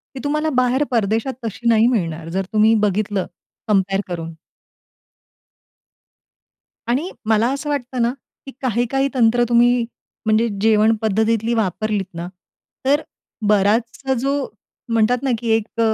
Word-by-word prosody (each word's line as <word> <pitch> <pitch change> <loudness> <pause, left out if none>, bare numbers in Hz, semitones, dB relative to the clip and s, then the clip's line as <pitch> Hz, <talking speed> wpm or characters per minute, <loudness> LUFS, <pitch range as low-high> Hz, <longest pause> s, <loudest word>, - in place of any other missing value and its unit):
ती - - -5
तुम्हाला 305 +2 0
बाहेर 255 +2 +3
परदेशात 225 +2 0
तशी 225 +2 -4
नाही 225 0 +5
मिळणार. 165 -9 -1
जर 190 +3 -2
तुम्ही 215 +1 +5
बघितलं 205 -1 0 0.4
कंपेअर 195 -2 +2
करून. 165 -2 -5 2.5
आणि 270 +10 0 0.2
मला 220 +2 +3
असं 285 +2 -4
वाटतं 255 -3 -2
ना, 235 +1 +2 0.3
की 270 - -8
काही, 240 -2 +1
काही 270 0 +2
तंत्र 240 -1 +4
तुम्ही 240 0 +4 0.4
म्हणजे 220 +2 +3
जेवण 220 +1 +4
पद्धतीतली 220 +2 +1
वापरलीत 210 -1 -1
ना 170 +1 -5 0.6
तर 285 +3 +3 0.5
बराचसा 225 +6 +1
जो 275 +3 0 0.6
म्हणतात 230 +3 +2
ना, 270 - +1
की 235 - -4
एक 225 +1 -4
225 Hz, 130 wpm, -20 LUFS, 210-245 Hz, 2.5 s, नाही